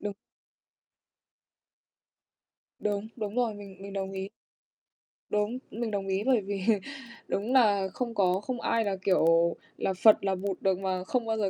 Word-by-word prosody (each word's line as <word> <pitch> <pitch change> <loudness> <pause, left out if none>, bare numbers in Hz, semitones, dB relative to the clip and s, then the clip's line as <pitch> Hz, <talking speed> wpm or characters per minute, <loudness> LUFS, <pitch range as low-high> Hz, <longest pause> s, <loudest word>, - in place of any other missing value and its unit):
Đúng. 205 -1 -4 2.6
Đúng, 205 0 -1
đúng 210 -2 -4
rồi, 240 -3 +1
mình 200 -2 -10
mình 200 0 -8
đồng 195 -1 -3
ý. 190 0 -4 1.0
Đúng, 210 +3 0
mình 225 +1 -3
đồng 200 -1 -2
ý, 195 +1 0
bởi 255 -3 +3
vì 200 0 -4 0.7
đúng 220 +6 -1
là 205 -6 +4
không 235 -2 -3
có, 185 -2 +3
không 245 +2 -4
ai 230 -1 +1
là, 200 -1 0
kiểu, 170 -3 +4 0.2
là 190 - 0
Phật, 210 +4 +6
là 195 -1 +1
Bụt 190 0 -3
được 190 -1 +2
mà 185 -1 -1
không 245 +4 -1
bao 225 0 -1
giờ 205 -3 +1
200 Hz, 160 wpm, -29 LUFS, 190-220 Hz, 2.6 s, Phật